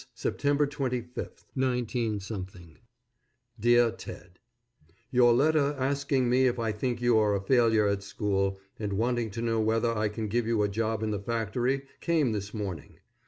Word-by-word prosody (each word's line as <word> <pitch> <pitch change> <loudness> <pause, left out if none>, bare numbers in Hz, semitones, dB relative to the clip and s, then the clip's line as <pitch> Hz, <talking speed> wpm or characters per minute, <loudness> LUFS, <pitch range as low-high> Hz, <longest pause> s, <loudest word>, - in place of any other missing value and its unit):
_September 145 0 +1
25, 125 -4 -4
19 125 -4 0
_ 95 -4 -8 0.8
DEAR 120 +1 +4
TED: 90 -2 -11 0.7
Your 125 -2 +5
letter 145 +3 +3
asking 140 -1 0
me 130 +2 +4
if 125 - 0
I 115 -2 -1
think 120 +3 -2
you 120 -2 +4
are 105 -1 +2
a - - 0
failure 115 -2 +4
at 100 0 0
school, 100 -1 -1 0.2
and 105 -2 -2
wanting 120 +2 0
to 115 +3 -5
know 115 -1 +1
whether 115 +1 +1
I 105 -1 0
can 110 +1 -4
give 115 +2 0
you 115 -2 +2
a - - +2
job 110 +1 -1
in 110 - -1
the 105 - -2
factory, 120 +5 -1 0.2
came 160 -7 +1
this 105 -1 -4
morning. 100 -8 -6
115 Hz, 165 wpm, -28 LUFS, 105-125 Hz, 0.8 s, Your